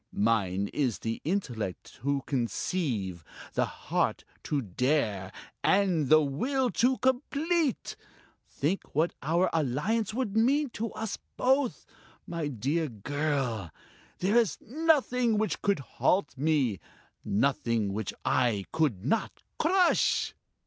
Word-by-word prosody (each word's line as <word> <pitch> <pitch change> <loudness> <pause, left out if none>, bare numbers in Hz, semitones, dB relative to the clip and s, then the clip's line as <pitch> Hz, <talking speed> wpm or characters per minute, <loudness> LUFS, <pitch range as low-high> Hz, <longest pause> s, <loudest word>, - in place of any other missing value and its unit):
Mine 100 -3 +1
is 130 -7 0
the 115 0 -4
intellect 125 - -3
to 140 0 0
conceive, 120 - -2 0.3
the - - +2
heart - - -1 0.2
to 145 - -1
dare, 110 - 0 0.3
and 185 -8 +3
the 155 0 +7
will 250 - 0
to 255 +2 +2
complete! 285 +3 0 0.5
Think 155 +4 -2
what 160 +4 +2
our 170 +5 +2
alliance 165 - 0
would 220 -3 -2
mean 270 +5 +3
to 225 +1 -3
us 220 -2 -4 0.2
both.... 260 0 +1 0.4
My 165 -3 -3
dear 145 +5 -1
girl 125 - -2 0.5
there 200 +5 +2
is 230 -4 +3
nothing 250 -5 +2
which 215 0 -1
could 200 -2 +2
halt 150 +4 0
me, 135 - +1 0.4
nothing 115 -3 +1
which 105 -1 -3
I 115 -7 +2
could 125 - 0
not 225 +11 -1 0.2
crush!" 360 +2 +3
155 Hz, 115 wpm, -29 LUFS, -, 0.5 s, the